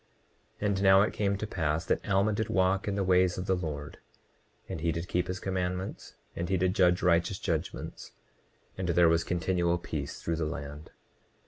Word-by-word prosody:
29:43 105 - +1
And 100 -1 0
now 95 0 +7
it 105 - -1
came 100 -1 0
to 110 - -3
pass 80 -4 -1
that - - -1
Alma 100 +2 +3
did 110 +2 -2
walk 95 -1 +2
in 100 - 0
the 100 - 0
ways 90 -1 +3
of 90 - -3
the 95 - +2
Lord, 75 -5 -5 0.7
and 95 -5 -5
he 85 0 +1
did 85 +2 -4
keep 90 +1 0
his 90 0 -3
commandments, 90 0 -3 0.2
and 85 +1 -3
he 95 - +2
did 90 +1 +1
judge 90 -2 +3
righteous 90 +2 +2
judgments; - - -4 0.7
and 90 -2 -2
there 85 0 +5
was 85 0 +2
continual 85 0 0
peace 85 - -5
through 85 -1 -2
the 80 - -1
land. 75 0 -6
90 Hz, 195 wpm, -29 LUFS, 85-95 Hz, 0.7 s, now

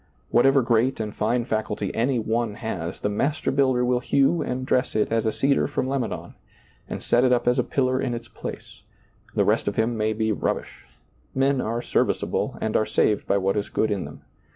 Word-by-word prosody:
Whatever 135 +2 +5
great 120 +2 +2
and 105 -1 -3
fine 115 +3 0
faculty 110 -4 -2
any 125 +3 +1
one 115 -1 -1
has, 95 -7 -5
the - - 0
Master 140 +9 0
builder 130 -3 +2
will 125 0 +2
hew 140 +6 +2
and 130 +1 -3
dress 130 -1 0
it 110 - +1
as 115 -1 +1
a - - +2
cedar 140 +3 +2
from 140 -2 -2
Lebanon, 135 -3 -3 0.6
and - - -5
set 120 - +3
it 130 - +4
up 125 -1 +2
as 125 +1 +3
a - - +3
pillar 130 0 0
in 125 -3 -1
its 120 0 -7
place; - - -9 0.5
the - - +3
rest - - +1
of - - -1
him 115 +2 +1
may 110 0 0
be 110 0 0
rub 105 - 0
bish. - - -13 0.5
Men 135 0 +2
are 115 +2 -2
serviceable - - 0
and 110 - -2
are 110 - +2
saved 105 - +1
by 100 - +3
what 95 0 0
is 105 -1 -2
good 110 - 0
in 100 -5 -1
them. 75 - -11
120 Hz, 210 wpm, -24 LUFS, 110-130 Hz, 0.6 s, Whatever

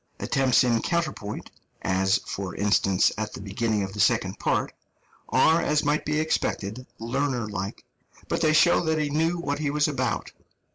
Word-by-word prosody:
Attempts 135 -2 +3
in 120 -2 +2
counterpoint 155 -12 -3 0.3
as, 95 0 +2
for 95 -2 -5
instance, 100 -2 +2
at 105 -1 -3
the - - -7
beginning 105 +1 -1
of 95 0 -5
the 105 - -7
second 105 -4 +2
part - - 0 0.6
are, 160 +1 +4
as 150 -2 +1
might 145 +1 +1
be 150 0 0
expected, 125 -6 -2
learner 125 0 -1
like, 100 -1 -5 0.4
but - - -1
they 155 -2 +4
show 170 +3 +5
that 160 -1 +1
he 150 -2 -1
knew 165 +3 +1
what 145 -4 -3
he 150 -2 -1
was 150 +1 +2
about. 145 - -2
125 Hz, 170 wpm, -25 LUFS, 100-155 Hz, 0.6 s, show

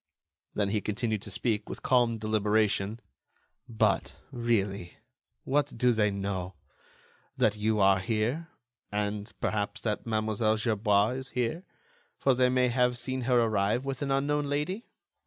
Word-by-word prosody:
Then 100 -1 +1
he 105 0 0
continued 110 0 -2
to - - -6
speak, 110 +1 -1
with - - -7
calm 120 -3 +3
deliberation: 110 0 +1 0.7
"But, 110 -2 +1 0.2
really, 105 -7 -1 0.5
what 145 -2 0
do 125 +1 +4
they 110 -2 +2
know? 95 -2 -3 0.8
That 105 - +3
you 105 +1 0
are 95 -1 +5
here, 115 - -1 0.4
and, 105 +1 -2
perhaps, 105 -1 -1
that 105 0 -2
Mlle. 110 0 +1
Gerbois 105 -2 +2
is 130 0 -7
here, 125 +9 -2 0.5
for 135 - +3
they 125 0 +3
may 125 0 +3
have 125 0 +2
seen 130 +2 -3
her 125 -1 +5
arrive 110 +2 +1
with 135 -2 -4
an 140 - -1
unknown 145 +2 +1
lady. 150 +10 -2
110 Hz, 140 wpm, -29 LUFS, 105-125 Hz, 0.8 s, are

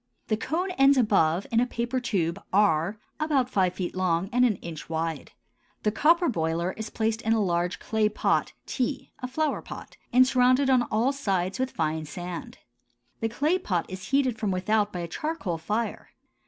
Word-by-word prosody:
The 215 - +3
cone 335 - -2
ends 275 0 +6
above 195 -7 +3
in 230 - +3
a 250 - +2
paper 240 +1 -2
tube 190 -6 -1
R, 190 0 +2 0.2
about 280 -5 +1
five 185 -4 +2
feet 180 -1 -4
long 185 0 0
and 250 +1 +4
an 235 -5 +3
inch 165 -4 -8
wide. 160 -2 -3 0.5
The 210 - +2
copper 335 - +4
boiler 170 - 0
is 220 +3 -6
placed 225 0 -1
in 225 - +1
a 225 - +2
large 175 -2 0
clay 220 -1 0
pot 210 - 0
T 260 +1 -3
(a 255 - -4
flower 305 +4 -1
pot) - - -10
and 255 +1 +6
surrounded 255 +1 +3
on 255 -1 +5
all 235 +6 +2
sides 195 -7 -1
with 260 0 0
fine 160 -4 -2
sand. 180 - -7 0.6
The 225 - -1
clay 300 +10 +1
pot 180 - -1
is 185 0 -7
heated 260 -4 +1
from 215 - -1
without 205 +3 +1
by 180 - -4
a 170 - -4
charcoal 225 - -3
fire. 215 +8 -3
215 Hz, 180 wpm, -27 LUFS, 180-255 Hz, 0.6 s, ends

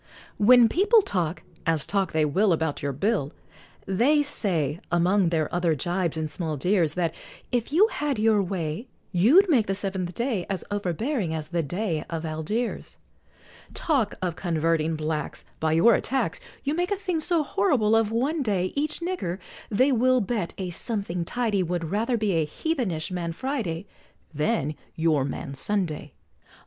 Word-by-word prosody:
When 240 +3 +7
people 410 - +4
talk, 175 - -2 0.2
as 160 -3 +2
talk 195 -3 0
they 155 -1 +2
will, 185 +6 +3
About 160 -2 -1
your 140 - -1
bill, 150 - -1 0.5
They 260 +11 +3
say, 170 - 0
among 180 +2 +3
their 160 -3 +1
other 175 -2 +2
jibes 175 +2 -1
and 160 -1 -1
small 155 -1 -3
jeers, 170 0 +1
That, 170 -3 0 0.4
if 245 0 -1
you 355 +8 +6
had 295 - -2
your 215 -1 +3
way, 180 +3 -3 0.2
You'd 250 - +5
make 255 - +3
the 195 - 0
seventh 190 -3 -3
day 235 -7 -1
As 195 -2 -2
overbearing 205 - -1
as 155 -1 -5
the 170 -1 0
Dey 170 +1 -2
of 165 -1 -3
Algiers. 160 +10 -3 0.8
Talk 265 -10 0
of 175 -3 -1
converting 165 -2 0
Blacks 155 -1 -3
By 160 0 +1
your 175 +9 +6
attacks, 265 - 0 0.2
You 285 - 0
make 355 +3 0
a 405 - +1
thing 370 -4 -2
so 325 0 +1
horrible 215 -2 +2
of 225 -1 +2
one 275 +8 0
day, 195 -7 0
Each 300 +3 -1
nigger, 340 - -2 0.3
they 255 +7 +3
will 255 +1 +3
bet 210 -5 -2
a 185 -2 -4
something 180 -3 -2
tidy, 220 -2 0
Would 170 -2 -2
rather 230 +4 +1
be 215 -2 0
a 165 -3 +2
heathenish 205 - -2
Man 170 -2 -3
Friday, 205 - -3 0.5
Than 150 -1 0 0.2
your 160 -4 +2
Man 135 0 -5
Sunday! 155 -3 -2
190 Hz, 160 wpm, -26 LUFS, 165-240 Hz, 0.8 s, When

